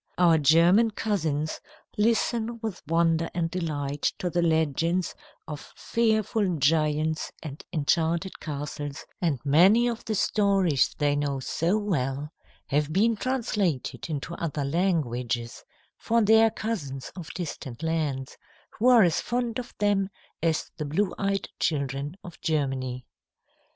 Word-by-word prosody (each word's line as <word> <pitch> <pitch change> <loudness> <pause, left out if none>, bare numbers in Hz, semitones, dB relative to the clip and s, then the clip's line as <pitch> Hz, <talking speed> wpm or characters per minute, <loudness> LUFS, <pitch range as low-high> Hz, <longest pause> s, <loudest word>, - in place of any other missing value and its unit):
Our 170 -3 +5
German 170 +10 +5
cousins 160 -9 -1 0.4
listen 230 +1 +1
with 220 -5 -4
wonder 165 0 +2
and 165 -1 -1
delight 145 -5 -3 0.2
to 180 - -2
the 175 - +1
legends 165 +2 +1 0.3
of 150 -2 -8
fearful 220 -4 +1
giants 155 +2 +1
and 150 -2 -7
enchanted 165 +4 0
castles, 145 -1 -5 0.2
and 160 -7 +1
many 190 +12 +5
of 235 -1 -3
the 220 - -1
stories 195 -8 +2
they 145 -1 +2
know 145 -2 -1
so 165 +8 0
well 150 -8 -2 0.3
have 150 +2 0
been 220 +7 +3
translated 200 - -1
into 155 +2 -4
other 150 -4 -2
languages 125 - -1 0.4
for 230 0 +2
their 220 +1 +6
cousins 150 - -4
of 175 -4 -7
distant 150 -7 -6
lands, 150 -5 -2 0.4
who 235 - +3
are 240 -4 +7
as 170 -3 +2
fond 240 -1 -2
of 245 - -8
them 200 -2 +1 0.3
as 165 -1 0
the 150 - -3
blue 180 +7 0
eyed 195 0 0
children 140 +1 -1
of 175 - -11
Germany. 130 -5 -1
165 Hz, 130 wpm, -27 LUFS, 145-200 Hz, 0.4 s, are